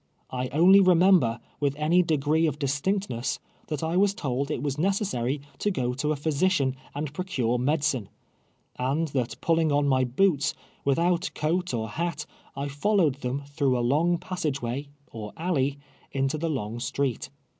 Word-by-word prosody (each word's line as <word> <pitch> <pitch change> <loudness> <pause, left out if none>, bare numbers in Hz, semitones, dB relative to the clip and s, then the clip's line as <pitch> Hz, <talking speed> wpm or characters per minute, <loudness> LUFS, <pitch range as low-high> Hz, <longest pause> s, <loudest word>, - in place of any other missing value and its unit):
I 130 0 -2
only 175 +9 +6
I'emember, 180 -10 +5 0.2
with 140 -1 0
any 155 +4 +3
degree 160 -1 +2
of 145 -2 -2
distinctness, 145 - -1 0.3
that 150 -1 -3
I 165 +2 0
was 200 +1 +3
told 140 - -2
it 150 -4 -2
was 145 0 -2
necessary 155 - 0 0.2
to 210 - +1
go 125 -10 -1
to 150 +4 -1
a - - +1
physician 145 -1 +1 0.2
and 145 0 -3
procure 130 -9 -1
medicine, 135 -5 0 0.7
and 145 +6 0
that 125 -3 -2
pulling 165 -2 +2
on 145 0 +2
my 130 -1 +3
boots, 140 +4 +2 0.3
without 170 +5 +2
coat 175 +4 0
or 110 -3 -2
hat, 160 +5 -3 0.3
I 140 +1 -3
fullowed 150 -1 +1
tiieni 140 +2 -3
through 140 -3 +1
a 120 - 0
lung 165 +6 +2
passage 165 -7 -3
way, 125 +4 -3 0.2
or 105 -2 -7
alley, 145 -5 0 0.3
into 135 +2 0
the 165 +1 -1
open 120 -5 -3
street. 130 0 -2
145 Hz, 160 wpm, -26 LUFS, 130-170 Hz, 0.7 s, only